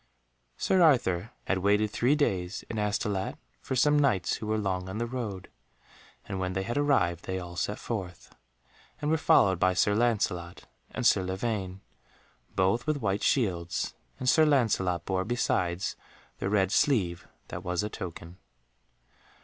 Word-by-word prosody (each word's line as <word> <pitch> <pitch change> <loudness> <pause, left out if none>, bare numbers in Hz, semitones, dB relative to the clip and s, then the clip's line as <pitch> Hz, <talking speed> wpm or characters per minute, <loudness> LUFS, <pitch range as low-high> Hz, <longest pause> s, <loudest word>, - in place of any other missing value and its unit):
Sir 190 - +2
Arthur 120 - +3 0.2
had 95 - 0
waited 105 +2 +2
three 125 +7 +2
days 95 - -1
in 110 - -3
Astolat 105 -2 -1 0.2
for 130 - -3
some 145 +3 +4
Knights 125 -11 +1
who 110 - -6
were 110 0 +1
long 95 -3 -2
on 95 - -5
the 120 - -1
road, 115 -6 -5 0.8
and 95 -2 -4
when 95 0 -2
they 95 +1 -1
had 120 +5 -3
arrived 135 - +1
they 95 - -2
all 85 -1 -8
set 105 +4 -2
forth, 95 -7 -6 0.7
and 150 +1 -1
were - - +4
followed 95 - +4
by 95 0 +3
Sir 105 +2 +3
Lancelot 105 -7 0 0.3
and - - -4
Sir - - +5
Lavaine, 95 0 -3 0.7
both 100 +8 +1
with 155 -1 +1
white 100 -6 -1
shields, 90 -9 0 0.3
and 130 - -4
Sir 155 +5 +6
Lancelot 105 - +2
bore 95 -1 0
besides 95 -6 -1 0.4
the 95 - -1
red 100 -2 +2
sleeve 90 -13 +1 0.2
that 85 - -6
was 90 +1 -1
a - - -1
token. 85 -3 -8
100 Hz, 155 wpm, -28 LUFS, 90-120 Hz, 0.8 s, Sir